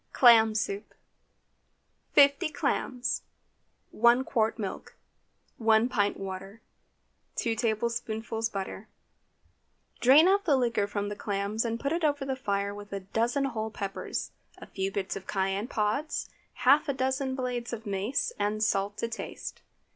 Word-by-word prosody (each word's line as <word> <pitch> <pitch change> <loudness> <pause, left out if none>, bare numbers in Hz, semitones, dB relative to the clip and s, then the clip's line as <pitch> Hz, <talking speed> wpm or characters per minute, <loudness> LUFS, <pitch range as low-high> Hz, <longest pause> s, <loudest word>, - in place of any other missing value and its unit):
CLAM 225 -3 +7
SOUP. 210 -2 -3 1.2
50 280 +1 +5
clams. 255 -4 -1 0.7
1 235 +3 +4
qt. 225 -3 +1
milk. 200 -4 -6 0.6
1 225 +1 +4
pint 205 -5 +1
water. 195 +2 -7 0.8
2 230 - 0
tablespoonfuls 225 0 -1
butter. 195 +1 -5 1.1
Drain 280 +7 +7
off 400 +1 +3
the 300 -5 +4
liquor 235 -5 +1
from 205 0 -3
the 205 - -4
clams 205 +2 -2
and 230 -1 -2
put 280 +2 -2
it 335 0 -1
over 290 -2 +1
the 265 -1 -1
fire 200 -5 -1
with 205 0 -10
a 200 0 -4
dozen 235 +8 0
whole 220 -4 -2
peppers, 200 -2 -4 0.3
a - - -10
few 195 0 -3
bits 195 -1 -3
of 195 - -8
cayenne 195 +2 -1
pods, 230 +7 -1 0.3
half 285 +4 +5
a - - +2
dozen 265 0 -1
blades 250 -2 -3
of 235 -1 -6
mace, 205 +7 -1
and 210 +1 0
salt 205 -1 0
to 230 - -1
taste. 230 - -7
225 Hz, 140 wpm, -29 LUFS, 205-255 Hz, 1.2 s, CLAM